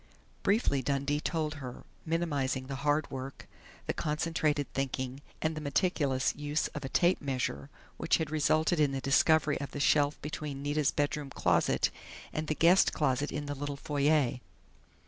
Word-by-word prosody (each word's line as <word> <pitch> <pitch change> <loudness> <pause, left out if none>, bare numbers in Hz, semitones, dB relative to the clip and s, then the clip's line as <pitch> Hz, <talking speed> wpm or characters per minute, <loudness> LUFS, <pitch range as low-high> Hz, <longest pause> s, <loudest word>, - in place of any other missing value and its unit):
Briefly 200 - +2
Dundee 140 +2 0
told 155 -1 -1
her, 125 -2 -7 0.2
minimizing 145 -6 -1
the 135 0 -5
hard 145 +2 0
work, 135 0 -7 0.4
the - - -1
concentrated 150 -1 0
thinking, 130 0 -3 0.2
and 160 0 0
the 155 - -5
meticulous 140 -3 +1
use 150 +1 -1
of - - -7
a 135 - -4
tape 175 +5 +3
measure 130 - -2 0.3
which - - +2
had 160 -2 -3
resulted 155 +2 +2
in 145 -2 +3
the 135 - -1
discovery 150 +2 +3
of 140 - -4
the 145 - -4
shelf 145 0 +3
between 145 -2 -5
Nita's 145 0 +1
bedroom 145 -1 -1
closet - - +2 0.4
and 155 0 -3
the 155 - 0
guest 175 +5 +5
closet 145 -1 0
in 145 0 -3
the 145 - -3
little 145 0 -4
foyer. 145 -3 +1
145 Hz, 160 wpm, -31 LUFS, 135-155 Hz, 0.4 s, guest